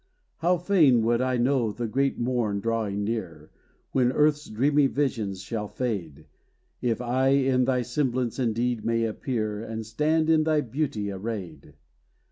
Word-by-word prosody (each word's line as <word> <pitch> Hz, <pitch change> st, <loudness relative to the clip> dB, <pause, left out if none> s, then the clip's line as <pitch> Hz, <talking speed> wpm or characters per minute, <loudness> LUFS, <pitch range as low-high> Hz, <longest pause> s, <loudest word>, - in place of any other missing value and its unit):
How 175 Hz, +2 st, +2 dB
fain 160 Hz, -, +4 dB
would 115 Hz, +2 st, +2 dB
I 130 Hz, -1 st, +1 dB
know 120 Hz, -2 st, +1 dB
the 120 Hz, +3 st, -4 dB
great 135 Hz, +5 st, 0 dB
morn 120 Hz, -4 st, 0 dB
drawing 110 Hz, -2 st, -1 dB
near, 95 Hz, -9 st, -4 dB, 0.4 s
When 125 Hz, -2 st, +2 dB
earth's 150 Hz, +2 st, +2 dB
dreamy 140 Hz, +6 st, +3 dB
visions 110 Hz, -10 st, -2 dB
shall 105 Hz, +2 st, -4 dB
fade, 90 Hz, -, -4 dB, 0.6 s
If 120 Hz, -1 st, 0 dB
I 125 Hz, +2 st, +1 dB
in 135 Hz, -2 st, +3 dB
thy 125 Hz, -1 st, +1 dB
semblance 125 Hz, -1 st, -1 dB
indeed 120 Hz, -1 st, 0 dB
may 115 Hz, +1 st, +1 dB
appear, 110 Hz, -2 st, -2 dB
And 110 Hz, -1 st, -5 dB
stand 155 Hz, +8 st, +1 dB
in 160 Hz, -1 st, +4 dB
thy 155 Hz, -1 st, +2 dB
beauty 125 Hz, -6 st, -2 dB
arrayed! 95 Hz, -7 st, -6 dB
120 Hz, 145 wpm, -26 LUFS, 110-135 Hz, 0.6 s, fain